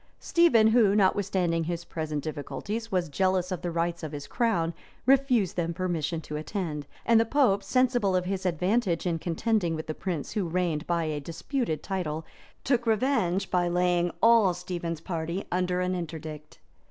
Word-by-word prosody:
Stephen, 275 -11 +4
who, 220 -3 +4
notwithstanding 185 -4 +2
his 170 0 -3
present 155 -3 -4
difficulties, 205 +9 -5
was 180 -2 +1
jealous 185 +3 0
of 180 - -3
the 175 - -2
rights 170 0 -1
of 155 -2 -6
his 145 -1 -5
crown, 175 - 0 0.3
refused 255 - +3
them 170 -1 -1
permission 170 -3 -1
to 150 -1 -6
attend;[*] 155 -3 -4 0.2
and 230 -1 +5
the - - +5
pope, 230 -5 +2
sensible 240 -3 +2
of 180 0 +1
his 190 0 -2
advantage 180 +1 0
in 170 -2 0
contending 175 +1 0
with 155 - -6
a - - -4
prince 170 -4 -4
who 200 -5 -1
reigned 170 -2 -1
by 170 -1 +1
a 155 -2 -2
disputed 165 - -3
title, 160 -5 -3 0.4
took 245 -2 +1
revenge 220 -5 +1
by 175 -1 +2
laying 175 0 +2
all 225 -6 +6
Stephen's 175 -2 -4
party 170 +2 -3
under 180 0 0
an 180 0 0
interdict. 155 -3 -6
180 Hz, 165 wpm, -27 LUFS, 165-205 Hz, 0.4 s, all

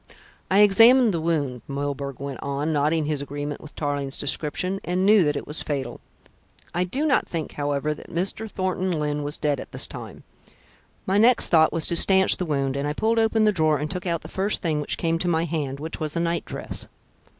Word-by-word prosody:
"I 195 +2 +5
examined 225 +3 +6
the 165 - -2
wound," 145 -7 -1
Milburgh 140 -1 -4
went 140 -2 -6
on, 140 +3 -2
nodding 150 +2 +1
his 150 -2 -1
agreement 145 +1 -5
with 155 - -13
Tarling's 145 -2 -3
description, 155 +7 -2
"and 180 +2 -1
knew 210 -1 +6
that 145 - 0
it - - -4
was 150 - 0
fatal. 140 -4 -4 0.7
I 180 +1 0
do 270 - -2
not 285 -4 +2
think, 165 -3 -4
however, 145 +1 -2
that - - -13
Mr. 195 +6 -2
Thornton 185 -1 -2
Lyne 150 -2 -2
was 145 0 -3
dead 145 -3 -1
at - - -9
this - - +1
time. - - -9 0.8
My 195 +2 +2
next 235 +1 +4
thought 160 -1 +5
was 165 -2 +1
to 170 - 0
stanch 190 +2 +5
the 180 - -2
wound, 140 -4 -1
and 140 +1 -2
I 150 - -1
pulled 225 +7 +1
open 220 0 +2
the 215 - +4
drawer 155 -5 +2
and 150 +2 -4
took 180 0 -4
out 170 -2 -1
the - - -10
first 195 +2 0
thing 155 -3 0
which 145 - -2
came 165 -1 0
to 180 - -2
my 165 -1 +1
hand, 145 -4 -3
which 160 +2 -6
was 155 -1 -4
a - - 0
night 170 0 -1
dress. - - -6
160 Hz, 215 wpm, -24 LUFS, 145-185 Hz, 0.8 s, examined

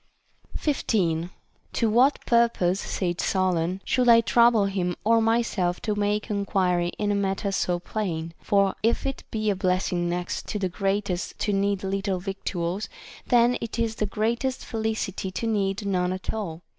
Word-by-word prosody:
15. 175 - 0 0.4
To 230 - +1
what 250 +6 +3
purpose, 230 -6 +2
said 175 -3 -2
Solon, 185 -1 0
should 250 -1 +2
I 230 0 +8
trouble 235 -1 +4
him 185 -3 -1
or 225 +2 +4
myself 225 -6 +1
to 215 - -1
make 210 +1 -1
enquiry 185 -4 +1
in 205 -1 0
a - - +2
matter 200 0 -1
so 180 -2 0
plain? 170 -4 -4
For 200 -1 +2
if 230 +4 +1
it 270 -1 -3
be 215 -1 0
a - - -1
blessing 180 -2 0
next 175 +1 -3
to 210 - -2
the 190 -2 -1
greatest 195 -1 -2
to 205 - +1
need 200 0 0
little 195 0 -1
victuals, 190 0 -3 0.4
then 245 0 +4
it 230 0 -5
is 230 -1 0
the 215 - 0
greatest 235 +6 -1
felicity 220 -4 -2
to 230 - -3
need 200 -2 0
none 180 -2 0
at 185 - -4
all. 175 -6 -5
200 Hz, 160 wpm, -25 LUFS, 180-220 Hz, 0.4 s, I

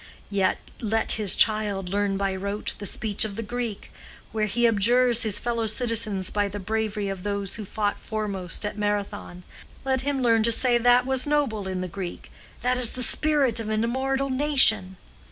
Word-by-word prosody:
Yet 195 -2 +1 0.2
let 225 0 0
his 210 -4 +5
child 210 -4 +1
learn 200 0 -1
by 195 -1 -1
rote 200 +2 -4
the 205 - -4
speech 210 +2 0
of 210 -2 -3
the 230 - -4
Greek, 235 -1 -5 0.4
where 215 -1 -1
he 240 +4 0
abjures 235 +3 +3
his 210 -3 0
fellow 230 -2 -2
citizens 220 -4 0
by 205 -1 0
the 200 +1 -6
bravery 215 0 -2
of 195 -2 -5
those 200 -1 -3
who 215 - -5
fought 205 +1 -2
foremost 200 -4 -4
at 210 0 -5
Marathon—let 205 +5 -4
him 275 -1 -2
learn 230 -2 +3
to 230 +2 +2
say 240 +1 +4
that 245 +1 +4
was 265 +1 +1
noble 265 -9 0
in 185 -1 -3
the 185 - -3
Greek, 180 0 -8 0.3
that 250 +1 +1
is 250 -2 +1
the 255 - -3
spirit 275 -2 +2
of 220 -1 -5
an 215 0 0
immortal 265 +3 -1
nation! 255 -9 +3
215 Hz, 180 wpm, -24 LUFS, 200-245 Hz, 0.4 s, his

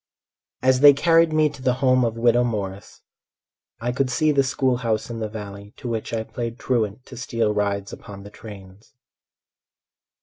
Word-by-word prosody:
As 130 0 +4
they 145 +1 +9
carried 165 +2 +3
me 155 0 +3
to 140 - -12
the 125 -1 +1
home 130 -1 +3
of 115 -1 -1
widow 120 +1 +3
Morris 100 -4 -5 0.8
I 120 +1 -2
could 130 +1 -1
see 155 +5 +2
the 140 -2 +3
school 130 -1 0
house 115 -1 -2
in 115 - -5
the 110 -1 -3
valley 100 -1 -9
To - - -8
which 115 -2 -3
I 115 -1 -2
played 115 +1 -6
truant 115 -2 -2
to 130 - -11
steal 115 -3 -1
rides 100 -1 -2
upon 100 -3 -10
the 105 - -12
trains. 100 +1 -13
115 Hz, 175 wpm, -23 LUFS, 105-130 Hz, 0.8 s, they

